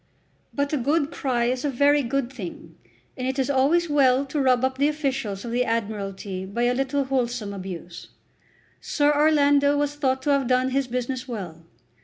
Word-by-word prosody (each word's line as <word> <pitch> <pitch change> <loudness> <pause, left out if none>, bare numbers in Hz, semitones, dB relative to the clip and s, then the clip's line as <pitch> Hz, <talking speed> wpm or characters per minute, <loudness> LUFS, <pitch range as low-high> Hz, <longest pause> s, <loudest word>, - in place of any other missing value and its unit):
But 285 +1 -2
a - - +2
good 290 +4 0
cry 245 -3 -1
is 250 +1 -1
a 290 - 0
very 285 +2 +3
good 265 0 -2
thing, 175 -7 -8 0.4
and 255 0 -3
it 265 +1 -2
is 270 +1 +1
always 295 +6 +3
well 275 -3 +3
to 285 +1 -2
rub 255 -1 +3
up 260 0 -3
the 285 - +4
officials 270 -9 -2
of 235 - -5
the 245 +1 +1
Admiralty 200 -4 -3
by 200 +5 -3
a 245 +1 +3
little 270 +2 0
wholesome 245 -5 -2
abuse. 185 -3 -8 0.7
Sir 295 0 +1
Orlando 290 -1 +4
was 290 0 0
thought 265 -3 -1
to 290 - +1
have 275 -3 +2
done 255 +1 +2
his 270 0 0
business 250 +2 -3
well. 175 -9 -7
260 Hz, 185 wpm, -24 LUFS, 235-285 Hz, 0.7 s, the